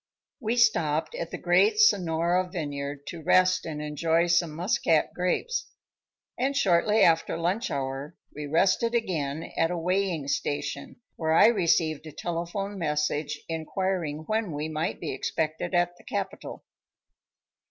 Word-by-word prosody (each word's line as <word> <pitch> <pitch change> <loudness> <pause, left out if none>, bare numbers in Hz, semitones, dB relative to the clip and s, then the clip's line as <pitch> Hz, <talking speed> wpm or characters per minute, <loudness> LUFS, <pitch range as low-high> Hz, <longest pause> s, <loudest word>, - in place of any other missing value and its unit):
We 235 -1 -1
stopped 165 - +2
at - - -4
the - - -5
great 425 +1 +3
Sonora 180 - +3
Vineyard 145 -4 -5
to 170 - -7
rest 185 +2 +3
and 155 -2 -5
enjoy 160 +3 +1
some 170 -1 +2
Muscat 175 -3 +1
grapes; 455 - -1 0.7
and 275 +2 0
shortly 210 -1 +3
after 165 0 +3
lunch 180 +8 -1
hour, 135 +3 -4 0.2
we 150 0 -5
rested 195 +9 +2
again 160 -9 -2
at 165 - +2
a 175 - -2
weighing 180 -3 -1
station, 140 0 -3 0.2
where 160 -1 0
I 165 - +7
received 165 -7 +1
a - - -8
telephone 175 +5 -4
message 150 -2 -1
inquiring 165 -1 -2
when 215 -4 -1
we 150 +1 -3
might 155 +1 -3
be - - -4
expected 155 +6 -2
at 175 0 +2
the - - -18
capital. - - -5
170 Hz, 140 wpm, -27 LUFS, 155-190 Hz, 0.7 s, I